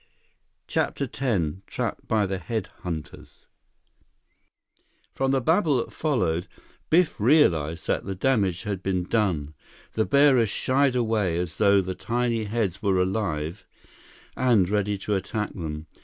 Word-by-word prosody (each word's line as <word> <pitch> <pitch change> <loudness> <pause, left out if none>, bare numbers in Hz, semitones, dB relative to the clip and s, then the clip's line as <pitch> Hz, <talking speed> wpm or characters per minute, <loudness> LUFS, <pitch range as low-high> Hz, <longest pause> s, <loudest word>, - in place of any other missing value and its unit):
CHAPTER - - -1
X 100 - -1
Trapped - - -4
by 110 -2 +2
the 95 -1 -3
Head 110 +3 -3
hunters 80 -4 -7 1.7
From 135 0 0
the 135 0 +2
babble 160 - +3
that 120 - -3
followed, 95 - 0 0.4
Biff 170 -3 +3
realized 85 - +3
that - - 0
the 95 0 -4
damage 95 -6 +1
had 100 -3 -3
been 95 -2 -1
done. 90 -8 0 0.4
The 110 - +1
bearers 140 -6 +4
shied 130 +5 +1
away 110 -8 +1
as 85 -2 -4
though 100 -2 +5
the 95 0 -4
tiny 120 +1 -1
heads 105 -4 -2
were 95 -3 +2
alive 90 -3 -2 0.7
and 115 -8 +3
ready 105 0 0
to 105 +2 -3
attack 100 +2 -2
them. 75 -3 -5
105 Hz, 135 wpm, -25 LUFS, 90-120 Hz, 1.7 s, though